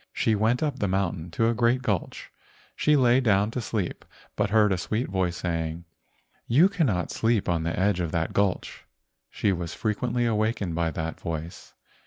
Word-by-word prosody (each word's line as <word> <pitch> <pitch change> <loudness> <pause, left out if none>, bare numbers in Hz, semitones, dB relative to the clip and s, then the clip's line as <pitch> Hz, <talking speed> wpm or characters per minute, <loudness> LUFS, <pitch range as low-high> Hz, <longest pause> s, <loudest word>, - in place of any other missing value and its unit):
She 110 - +1
went 110 +6 +1
up 145 -4 -2
the 100 - 0
mountain 90 -3 -1
to 115 +7 +1
a 115 - +2
great 120 +2 +2
gulch. 105 -9 -3 0.4
She 150 - +3
lay 125 -2 +4
down 105 -3 +2
to 125 - -3
sleep, 105 -6 -3 0.3
but - - 0
heard 105 -1 +4
a - - -1
sweet 110 +9 -2
voice 90 -2 -1
saying, 80 -1 -3 0.6
"You 155 +11 +5
cannot 130 - 0
sleep 115 -2 +1
on 85 -2 +1
the 85 +2 -2
edge 100 -1 +2
of 85 -3 -2
that 80 0 -1
gulch." 100 -2 -1 0.4
She 100 - 0
was 85 -2 -4
frequently 120 +3 -1
awakened 110 -5 0
by 85 0 0
that 80 +1 -4
voice. 85 +1 -6
100 Hz, 180 wpm, -26 LUFS, 85-115 Hz, 0.6 s, You